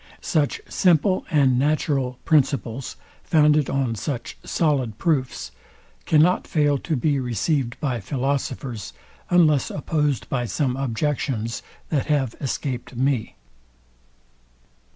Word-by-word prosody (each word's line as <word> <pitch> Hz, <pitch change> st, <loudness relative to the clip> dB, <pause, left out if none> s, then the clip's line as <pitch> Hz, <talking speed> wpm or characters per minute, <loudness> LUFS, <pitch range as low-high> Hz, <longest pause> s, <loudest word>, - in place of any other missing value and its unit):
Such 150 Hz, -4 st, 0 dB
simple 185 Hz, +1 st, +2 dB
and 135 Hz, -6 st, +3 dB
natural 140 Hz, -3 st, 0 dB
principles, 135 Hz, -, +1 dB, 0.3 s
founded 150 Hz, -3 st, +3 dB
on 135 Hz, -4 st, 0 dB
such 120 Hz, +3 st, -4 dB
solid 135 Hz, -9 st, 0 dB
proofs, 130 Hz, -, -1 dB, 0.6 s
cannot 160 Hz, +4 st, +4 dB
fail 145 Hz, -3 st, +2 dB
to 160 Hz, -, -2 dB
be 140 Hz, +2 st, +1 dB
received 125 Hz, -, -1 dB
by 130 Hz, -6 st, -1 dB
philosophers, 130 Hz, -2 st, -3 dB, 0.4 s
unless 155 Hz, -6 st, +4 dB
opposed 150 Hz, -, -1 dB
by 125 Hz, -2 st, -1 dB
some 130 Hz, +2 st, -1 dB
objections, 130 Hz, -3 st, -2 dB, 0.3 s
that 145 Hz, -5 st, 0 dB
have 135 Hz, -6 st, +1 dB
escaped 130 Hz, -2 st, -3 dB
me. 130 Hz, -2 st, 0 dB
135 Hz, 105 wpm, -23 LUFS, 125-150 Hz, 0.6 s, cannot